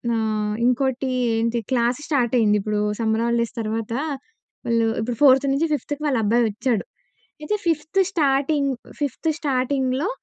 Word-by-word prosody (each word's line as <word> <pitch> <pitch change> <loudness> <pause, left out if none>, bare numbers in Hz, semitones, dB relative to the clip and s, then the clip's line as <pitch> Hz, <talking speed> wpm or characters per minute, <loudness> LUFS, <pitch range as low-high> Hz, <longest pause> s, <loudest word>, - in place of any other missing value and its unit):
ఆహ్, 215 -1 -1
ఇంకోటి 265 +1 0 0.3
ఏంటి 230 +1 0
క్లాస్ 240 0 +1
స్టార్ట్ 255 -6 +1
అయింది. 210 -2 +3
ఇప్పుడు 210 +1 -1 0.2
సమ్మర్ 225 0 +1
హాలిడేస్ 235 0 0
తర్వాత 225 +1 -3 0.7
వాళ్ళు 230 -1 +2
ఇప్పుడు 235 +1 -3
ఫోర్త్ 270 0 +6
నుంచి 305 +4 +1
ఫిఫ్త్‌కి 290 +1 -3
వాళ్ళ 270 -4 +1
అబ్బాయి 235 +3 +3
ఒచ్చాడు. 225 0 -1 0.6
అయితే 420 +8 -1
ఫిఫ్త్ 320 +3 0
స్టార్టింగ్, 280 -2 +1 0.3
ఫిఫ్త్ 290 +3 -1
స్టార్టింగ్‌లో 265 - 0
250 Hz, 135 wpm, -22 LUFS, 225-280 Hz, 0.7 s, ఫోర్త్